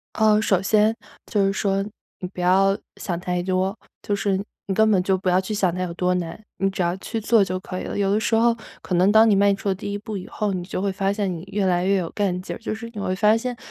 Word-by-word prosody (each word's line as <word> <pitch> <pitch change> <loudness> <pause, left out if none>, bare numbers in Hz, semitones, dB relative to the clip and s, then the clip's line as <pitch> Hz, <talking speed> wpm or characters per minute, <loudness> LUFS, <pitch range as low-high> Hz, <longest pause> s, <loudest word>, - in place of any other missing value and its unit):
呃， 215 -1 +4
首 190 -4 +2
先 215 +2 +3 0.3
就 200 -2 +1
是 195 - +1
说， 195 -1 0 0.4
你 180 - -4
不 - - -6
要 195 +2 +4 0.2
想 175 -3 -3
太 180 0 -2
多， 185 +2 0 0.3
就 205 - -1
是 200 -1 0 0.3
你 195 - -1
根 220 +1 +4
本 190 -4 +3
就 190 +1 +2
不 185 0 -1
要 180 +1 +4
去 190 +3 -4
想 185 -4 +1
它 185 - -3
有 175 - -4
多 180 +1 +1
难， 170 -2 -4 0.2
你 195 +1 +2
只 190 -1 -2
要 175 0 +1
去 225 - -4
做 225 0 +4
就 185 -1 -1
可 185 0 -6
以 - - -6
了。 - - -5
有 200 -1 +1
的 210 - +2
时 225 - 0
候 230 +1 +4 0.3
可 185 - -3
能 185 +3 +4
当 220 +1 +6
你 210 - +5
迈 200 0 +4
出 195 +1 -2
了 190 - +1
第 200 - -6
1 200 - -2
步 205 0 -5
以 180 - -8
后， 210 -2 -2
你 180 -2 -3
就 185 0 -4
会 200 -1 0
发 195 0 0
现 200 -2 -1
你 165 -2 -6
越 200 0 0
来 180 -1 +1
越 200 - +3
有 175 -3 -2
干 185 -3 -1
劲 - - -5
儿， - - -8
就 225 -1 -4
是 230 +1 -8
你 210 - -6
会 185 -1 -1
发 210 +2 +4
现 245 +2 -2
195 Hz, 300 characters per minute, -23 LUFS, 185-210 Hz, 0.4 s, 当